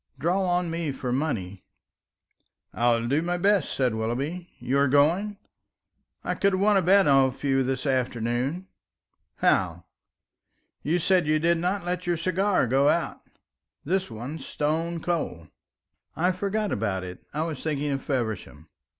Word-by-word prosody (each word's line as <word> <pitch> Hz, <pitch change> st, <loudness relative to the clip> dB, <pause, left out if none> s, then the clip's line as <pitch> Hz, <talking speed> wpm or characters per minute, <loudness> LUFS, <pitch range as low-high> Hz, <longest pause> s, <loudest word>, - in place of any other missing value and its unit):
Draw 175 Hz, +7 st, +1 dB
on 175 Hz, -2 st, 0 dB
me 165 Hz, -3 st, -2 dB
for 130 Hz, -2 st, -4 dB
money." 100 Hz, -10 st, -2 dB, 1.1 s
"I 120 Hz, +1 st, +2 dB
will 115 Hz, 0 st, -2 dB
do 140 Hz, +5 st, +2 dB
my 175 Hz, +1 st, -1 dB
best," 200 Hz, +2 st, +2 dB
said 125 Hz, -4 st, +1 dB
Willoughby. 135 Hz, +11 st, -3 dB
"You 130 Hz, +3 st, 0 dB
are 140 Hz, -, +4 dB
going? 170 Hz, +10 st, +2 dB, 0.9 s
I -, -, -1 dB
could 200 Hz, -1 st, +1 dB
have 185 Hz, -, +1 dB
won 205 Hz, +1 st, +4 dB
a 195 Hz, -, +4 dB
bet 195 Hz, +3 st, +5 dB
off 135 Hz, -2 st, +3 dB
you 135 Hz, -1 st, +2 dB
this 130 Hz, +1 st, -2 dB
afternoon." 130 Hz, +5 st, -1 dB, 0.7 s
"How?" 90 Hz, -2 st, +1 dB, 1.0 s
"You 160 Hz, +4 st, +1 dB
said 180 Hz, 0 st, +2 dB
that -, -, -3 dB
you 155 Hz, -, +4 dB
did 170 Hz, +2 st, +2 dB
not 180 Hz, +2 st, -1 dB
let 180 Hz, 0 st, -3 dB
your 175 Hz, -1 st, +1 dB
cigars 185 Hz, -, +1 dB
go 140 Hz, +2 st, +4 dB
out. -, -, -1 dB, 0.6 s
This 185 Hz, +3 st, 0 dB
one's 125 Hz, +7 st, -7 dB
stone 165 Hz, +4 st, -2 dB
cold." 155 Hz, -, -3 dB, 0.7 s
"I 180 Hz, +3 st, +2 dB
forgot 200 Hz, +3 st, -2 dB
about 100 Hz, -3 st, -1 dB
it; 90 Hz, 0 st, -9 dB
I 155 Hz, +2 st, -1 dB
was 160 Hz, -5 st, -4 dB
thinking 150 Hz, -2 st, -1 dB
of 135 Hz, -1 st, -2 dB
Feversham. 110 Hz, -, -3 dB
150 Hz, 160 wpm, -26 LUFS, 125-180 Hz, 1.1 s, bet